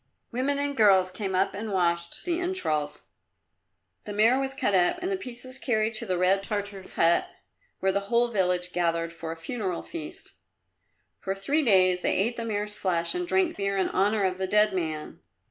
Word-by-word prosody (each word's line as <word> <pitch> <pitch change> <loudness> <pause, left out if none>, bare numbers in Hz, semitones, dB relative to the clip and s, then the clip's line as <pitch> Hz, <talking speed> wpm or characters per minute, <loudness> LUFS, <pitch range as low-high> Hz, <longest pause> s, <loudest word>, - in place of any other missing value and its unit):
Women 265 +4 0
and 285 0 -1
girls 190 -5 +5
came 190 0 -3
up 190 +2 +1
and 210 +2 -5
washed 170 -2 -1
the 345 -1 0
entrails. 155 - -2 0.9
The 205 - -5
mare 225 +5 +4
was 270 0 -2
cut 255 -7 0
up 180 - +3
and 365 +2 -2
the - - +1
pieces 255 -5 -6
carried 220 -3 0
to 225 +1 -4
the 185 -1 0
red 185 +2 +3
Tartar's 200 -1 -4
hut, 170 +1 +3 0.5
where 190 - +2
the 200 - +1
whole 240 0 +3
village 180 -4 0
gathered 170 -1 0
for 165 -1 -6
a 165 - -6
funeral 185 +1 -4
feast. 335 +2 -8 0.9
For 195 - -3
three 275 +11 +1
days 185 -6 +4
they - - +1
ate 230 +5 +1
the 230 - -4
mare's 210 -1 -3
flesh 175 -4 -1
and 355 0 -3
drank 370 -1 +1
beer 200 0 -1
in 190 - +1
honour 205 +2 +1
of 185 -1 0
the 190 - 0
dead 210 +1 +4
man. 160 -4 -4
200 Hz, 190 wpm, -27 LUFS, 180-240 Hz, 0.9 s, girls